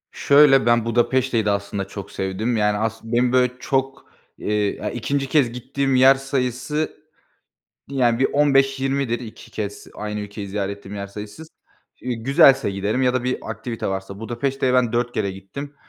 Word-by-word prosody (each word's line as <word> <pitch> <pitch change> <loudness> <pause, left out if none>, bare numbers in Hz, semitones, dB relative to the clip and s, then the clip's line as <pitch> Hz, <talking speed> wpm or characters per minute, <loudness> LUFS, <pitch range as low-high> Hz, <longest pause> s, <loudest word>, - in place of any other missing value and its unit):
Şöyle: 140 -2 +5
Ben 120 -1 +3
Budapeşte'yi 120 0 +1
de 105 - +2
aslında 100 -1 -2
çok 100 0 -8
sevdim. 100 +5 -2
Yani 105 -1 +2
aslın 110 +1 -3
benim, 120 +1 +3
böyle, 125 -1 +3
çok, 135 +1 -2 0.3
iii, 105 -1 -1
ya, 105 - -4
2. 135 +3 -2
kez 135 -6 +3
gittiğim 135 +2 -1
yer 130 +1 +7
sayısı 135 +3 -2 0.9
yani 125 -4 +1
bir 135 - +3
15-20'dir, 135 -3 +2
2 115 -2 -11
kez 105 -1 -5
aynı 105 0 -4
ülkeyi 105 0 -7
ziyaret 100 0 -3
ettiğim 100 0 -10
yer 100 0 -4
sayısı. 105 +7 -9 0.5
G 125 -1 -4
güzelse 135 +1 +4
giderim 100 +6 -1
ya 125 -1 +2
da 130 -1 -1
bir 130 0 -1
aktivite 115 -2 -5
varsa 95 +1 -5
Budapeşte'ye 130 +3 -1
ben 125 -3 +2
4 120 0 0
kere 100 -4 -1
gittim, 100 +10 -8
120 Hz, 160 wpm, -22 LUFS, 105-135 Hz, 0.9 s, yer